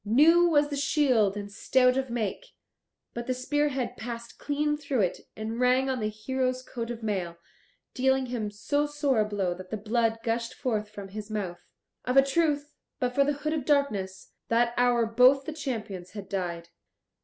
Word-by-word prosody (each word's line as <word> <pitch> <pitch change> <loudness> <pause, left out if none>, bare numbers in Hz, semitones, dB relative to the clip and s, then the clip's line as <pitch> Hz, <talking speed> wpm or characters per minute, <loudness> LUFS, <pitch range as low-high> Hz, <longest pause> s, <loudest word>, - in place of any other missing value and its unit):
New 310 +11 +5
was 290 -2 +3
the 290 - -3
shield 260 -8 +2
and 205 0 -6
stout 250 +4 +3
of 265 -1 -1
make, 235 - -3 0.7
but 235 0 -5
the 255 - 0
spearhead 270 -1 -1
passed 235 0 -7
clean 295 +1 0
through 280 -5 -1
it, 180 -3 0 0.2
and 220 +2 -4
rang 255 +2 +3
on 255 - -2
the 215 -1 -1
hero's 255 +4 -2
coat 235 -2 -5
of 235 -1 -6
mail, 185 -6 -2 0.6
dealing 265 +1 +2
him 240 -4 -3
so 285 +8 -1
sore 290 -4 +1
a 215 - +3
blow 200 -4 -1
that 185 +1 -10
the 220 - -3
blood 225 +2 +1
gushed 230 0 -2
forth 215 -5 -2
from 200 -2 -9
his 210 +2 -7
mouth. 195 -5 -4 0.4
Of 250 +2 0
a 270 - +9
truth, 295 0 0 0.3
but 250 -1 0
for 280 - +4
the 290 +1 +1
Hood 305 - +1
of 310 -4 -1
Darkness, 210 -10 0 0.2
that 235 +1 +2
hour 245 -1 +3
both 250 +4 +5
the 315 - -4
champions 215 - -5
had 205 -3 -7
died. 175 -3 -4
245 Hz, 185 wpm, -28 LUFS, 210-275 Hz, 0.7 s, a